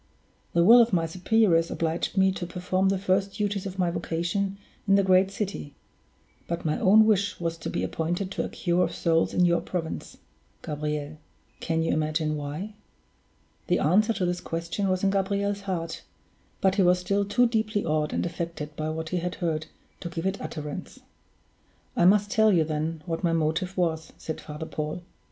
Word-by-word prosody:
The 170 - +4
will 235 +6 +9
of 230 -3 +2
my 165 -2 +2
superiors 180 0 +2
obliged 165 +4 -2
me 190 0 +5
to 180 -2 -5
perform 185 +2 0
the 195 - +1
first 195 +1 0
duties 205 -2 -1
of 190 0 -7
my 180 -2 +1
vocation 175 +4 -2 0.3
in 195 - +5
the 200 - +4
great 190 0 +4
city; 195 -7 -5 0.7
but 170 0 -3
my 155 - 0
own 215 +3 +6
wish 205 -2 +1
was 165 -1 -2
to - - -4
be - - -2
appointed 175 +4 -2
to - - -2
a - - -4
cure 175 0 +1
of - - -2
souls 165 -1 +2
in 180 - +3
your 170 -1 +3
province, 165 -3 -5 0.5
Gabriel. 150 0 -4 0.4
Can 165 0 0
you 165 - +1
imagine 155 0 0
why?" 150 +8 -5 0.9
The 180 - +3
answer 205 +9 +3
to 195 -4 -1
this 175 0 -1
question 170 +4 -2
was 185 0 0
in 195 - +3
Gabriel's 200 +1 0
heart; 165 -3 -3 0.6
but 190 -1 +4
he - - +5
was 180 0 +5
still 200 +3 0
too 205 +5 +3
deeply 220 -3 0
awed 155 -1 0
and - - -1
affected 170 -3 -5
by 155 +1 -3
what 160 0 -4
he 180 - -1
had 180 +1 -3
heard 160 -3 -2 0.3
to 170 - -5
give 165 +1 -5
it 190 +1 -1
utterance. 150 -2 -6 1.0
"I - - +3
must 205 +2 +4
tell 220 -1 +4
you, 170 -4 +4
then, 155 +1 -3
what 165 0 -3
my 170 -1 +2
motive 165 +4 -1
was," 160 -3 -1
said 160 - -6
Father 150 +1 -7
Paul. 155 +3 -4
175 Hz, 185 wpm, -26 LUFS, 160-195 Hz, 1.0 s, will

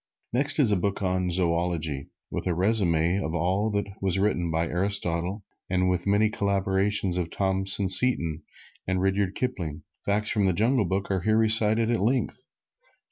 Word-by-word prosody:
Next 140 +4 0
is 135 -8 +4
a - - +3
book 100 +2 -2
on 90 -1 0
Zoology, 85 -5 -1 0.2
with - - -4
a 90 - 0
resume 90 -3 +2
of 80 -1 -4
all 95 +5 0
that 100 -1 -1 0.2
was 95 -1 +2
written 95 -4 0
by 80 +1 -1
Aristotle, 90 +1 -1 0.3
and 90 0 +1
with 90 +1 -3
many 105 +2 +3
corroborations 100 -1 0
of 85 -2 -2
Thompson 95 +1 +1
Seton 90 -6 +2 0.5
and 95 0 0
Rudyard 95 0 0
Kipling. 90 - -4 0.2
Facts 105 +1 0
from 105 -3 +1
the 95 - +1
"Jungle 115 +4 +1
Book" 95 +2 -2
are 95 -2 0
here 110 +4 +1
recited 110 +1 +4
at 115 - 0
length. 120 +2 -1
95 Hz, 165 wpm, -26 LUFS, 90-105 Hz, 0.5 s, is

